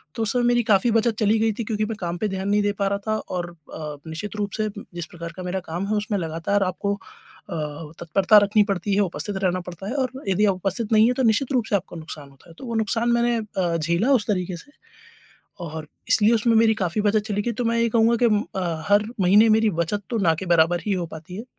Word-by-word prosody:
तो 225 - -1
उसमें 240 +3 +2
मेरी 240 0 +3
काफ़ी 210 +2 +3
बचत 225 0 +2
चली 215 0 +3
गई 220 0 +2
थी - - 0
क्योंकि 215 -1 -1
मैं 225 - -4
काम 175 0 -3
पे 215 - -1
ध्यान 190 +1 -3
नहीं 205 0 +3
दे 205 - +2
पा 200 - +2
रहा 200 0 -1
था 215 0 +1
और 175 -4 -4 0.2
अ, 150 -2 -6
निश्चित 205 +7 -6
रूप 205 -1 -2
से 215 -1 0 0.3
जिस 175 -1 -4
प्रकार 170 -1 -8
का 185 - -6
मेरा 180 +1 -2
काम 180 +4 -2
है 215 - 0
उसमें 210 0 -1
लगातार 165 +4 -1
आपको 195 +2 -1
अ, 155 -5 -9
तत्परता 195 +5 +4
रखनी 210 +1 +3
पड़ती 195 +2 -3
है, 205 - +3
उपस्थित 195 +1 -2
रहना 185 0 +1
पड़ता 180 +2 -8
है 245 - -3
और 260 -3 0 0.2
यदि 200 +3 +3
आप 195 - +2
उपस्थित 195 +4 -3
नहीं 215 +1 +6
है, 250 - +2
तो 260 +1 -1
निश्चित 230 +4 +2
रूप 245 -4 +1
से - - +2
आपको 185 -2 -3
नुकसान 155 -3 -8
होता 135 +5 -21
है। - - -13
तो - - -8
वो 235 -2 -4
नुकसान 225 +2 0
मैंने 235 0 +2
अ, 190 -6 -2
झेला 170 - +1
उस 235 -6 +1
तरीके 185 -4 -1
से 290 - -15 0.9
और 155 -1 -6 0.2
इसलिए 225 -1 +4
उसमें 230 +1 +2
मेरी 220 0 +5
काफ़ी 190 0 -1
बचत 210 +1 +3
चली 205 -1 -1
गई। 240 - -1
तो 240 +2 -3
मैं 230 0 +1
यही 235 0 +2
कहूँगा 230 +1 +3
कि 240 - 0
अम, 210 -2 +3 0.2
अ, 170 -4 -2
हर 205 +1 +4 0.2
महीने 205 +5 +6
मेरी 220 -1 +2
बचत 205 +5 -3
तो 230 - 0
ना 165 - +4
के 190 - -5
बराबर 165 +1 +3
ही 205 - +1
हो 180 -3 -1
पाती 165 +4 -10
है। 220 - -6
205 Hz, 255 wpm, -23 LUFS, 175-225 Hz, 0.9 s, नहीं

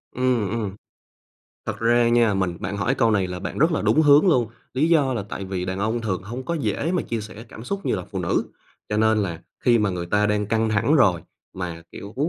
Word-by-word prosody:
Ừm, 125 -6 +1
ừm. 105 -4 -3 0.9
Thật - - -3
ra 120 +1 +3
nha, 120 -3 +3
mình 95 -3 -1
bạn 100 +3 -3
hỏi 110 +6 0
câu 115 -4 +2
này 100 -3 +2
là 90 0 -5
bạn 90 - -5
rất 160 +4 +3
là 160 - 0
đúng 155 - +3
hướng 145 +5 +6
luôn, 125 -8 +3 0.3
lý 145 +5 +2
do 145 -6 +3
là 110 - -2
tại 100 - -5
vì 95 -1 -3
đàn 95 +1 -3
ông 110 +3 -1
thường 95 -5 -2
hông 120 +7 -6
có 170 - -2
dễ 160 +2 -1
mà 180 - +1
chia 115 -1 -3
sẻ 110 +1 -9
cảm 110 - -10
xúc 200 +7 -4
như - - +1
là 90 - -4
phụ - - -4
nữ, - - 0 0.4
cho 105 - -1
nên 110 0 +3
là 85 -4 -4 0.2
khi 120 -2 +5
mà 105 -2 +1
người 90 -1 -4
ta 105 +3 +2
đang 105 0 0
căng 110 +1 +1
thẳng 110 +8 +2
rồi, 95 - +4 0.3
mà, 85 -3 -5
kiểu, 100 +2 -9
110 Hz, 245 wpm, -23 LUFS, 95-125 Hz, 0.9 s, hướng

